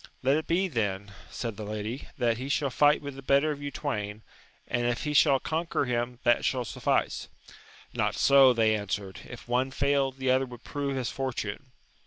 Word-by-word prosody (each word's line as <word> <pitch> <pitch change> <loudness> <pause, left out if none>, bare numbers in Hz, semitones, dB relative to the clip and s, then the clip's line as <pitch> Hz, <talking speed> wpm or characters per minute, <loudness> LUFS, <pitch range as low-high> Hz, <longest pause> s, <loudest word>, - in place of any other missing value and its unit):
Let 135 +2 +4
it 155 - -2
be, 185 +3 +2
then, 100 - -2 0.2
said 115 -4 -5
the 110 - -5
lady, 110 +5 -5
that 115 -1 +1
he 130 +2 -5
shall 140 -1 0
fight 145 +3 +4
with 140 -1 -5
the 135 - -9
better 140 +3 +3
of 145 -1 -6
you 145 - -3
twain, 105 -8 -4 0.4
and 120 0 0
if 120 0 -1
he 150 - -2
shall 140 -1 +5
conquer 160 -1 -1
him 120 0 -2
that 120 -1 +3
shall 130 -2 0
suflBce. - - -1 0.7
Not - - 0
so, 135 -2 +6
they 110 -2 +3
answered; 100 -2 -4
if 120 - -10
one 125 +2 +1
failed, 135 -1 +1
the 130 -1 +1
other 130 +1 +2
would 120 -2 -11
prove 140 -2 -3
his 125 -2 -2
fortune. 130 -2 -4
130 Hz, 195 wpm, -28 LUFS, 115-140 Hz, 0.7 s, so